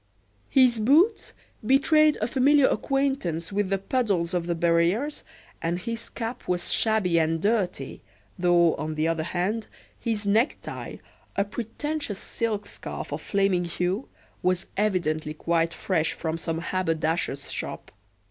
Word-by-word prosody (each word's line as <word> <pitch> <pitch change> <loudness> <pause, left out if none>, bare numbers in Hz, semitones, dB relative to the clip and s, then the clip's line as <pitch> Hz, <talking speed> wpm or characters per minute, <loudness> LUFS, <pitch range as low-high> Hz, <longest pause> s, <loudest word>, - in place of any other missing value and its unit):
His 255 -4 +4
boots 315 - +3 0.3
betrayed 305 +5 +4
a - - +2
familiar 275 +3 +4
acquaintance 265 - 0
with 200 -1 0
the 195 - +2
puddles 195 -5 0
of 175 -1 -1
the 170 - 0
barrieres, 170 - +1 0.4
and 170 +1 0
his 230 +4 -5
cap 235 +1 -5
was 180 -1 -1
shabby 210 -7 +2
and 165 0 +1
dirty, 205 -1 -1 0.3
though, 175 -2 +4
on 155 +1 -3
the 155 +1 +1
other 165 -1 0
hand, 185 +7 -2 0.3
his 220 -3 -2
necktie, 220 +7 0 0.4
a 200 - +2
pretentious 240 +3 -4
silk 215 -1 -2
scarf - - -7
of - - -4
flaming 195 -3 +1
hue, 180 +7 -2 0.3
was 185 +1 +1
evidently 155 -7 0
quite 165 +1 +1
fresh 165 -3 0
from 160 -1 -3
some 165 0 -3
haberdasher's 165 -5 -1
shop. - - -5
190 Hz, 135 wpm, -26 LUFS, 170-230 Hz, 0.4 s, His